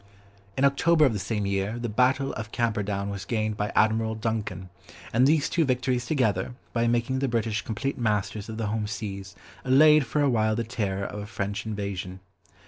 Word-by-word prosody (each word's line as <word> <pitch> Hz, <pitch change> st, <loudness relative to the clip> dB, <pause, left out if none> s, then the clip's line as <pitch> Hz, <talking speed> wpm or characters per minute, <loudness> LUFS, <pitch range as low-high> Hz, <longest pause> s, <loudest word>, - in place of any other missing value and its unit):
In 135 Hz, -, +4 dB
October 155 Hz, +3 st, +4 dB
of 130 Hz, -, +2 dB
the 105 Hz, -, -2 dB
same 105 Hz, +1 st, -2 dB
year, 100 Hz, +3 st, -1 dB
the 120 Hz, 0 st, -3 dB
battle 130 Hz, +5 st, +2 dB
of 110 Hz, -1 st, -6 dB
Camperdown 105 Hz, -3 st, -1 dB
was 100 Hz, 0 st, -5 dB
gained 110 Hz, 0 st, -1 dB
by 105 Hz, 0 st, -2 dB
Admiral 110 Hz, 0 st, +2 dB
Duncan, 110 Hz, -4 st, -3 dB, 0.4 s
and 125 Hz, +3 st, +5 dB
these 155 Hz, +1 st, +3 dB
two 170 Hz, -, +1 dB
victories 125 Hz, -2 st, 0 dB
together, 125 Hz, -4 st, 0 dB, 0.2 s
by 115 Hz, 0 st, +1 dB
making 120 Hz, +3 st, +1 dB
the 135 Hz, -, 0 dB
British 115 Hz, -3 st, -1 dB
complete 135 Hz, +4 st, -3 dB
masters 105 Hz, -1 st, -1 dB
of 110 Hz, -, -6 dB
the 115 Hz, -, -2 dB
home 105 Hz, 0 st, -1 dB
seas 100 Hz, -2 st, -6 dB, 0.3 s
allayed 150 Hz, +1 st, +6 dB
for 145 Hz, +6 st, +1 dB
a -, -, +4 dB
while 110 Hz, -4 st, +2 dB
the 115 Hz, -, -1 dB
terror 100 Hz, -4 st, -2 dB
of 105 Hz, -, -6 dB
a 105 Hz, -, -6 dB
French 100 Hz, 0 st, -4 dB
invasion. 100 Hz, -3 st, -4 dB
110 Hz, 190 wpm, -26 LUFS, 105-125 Hz, 0.4 s, allayed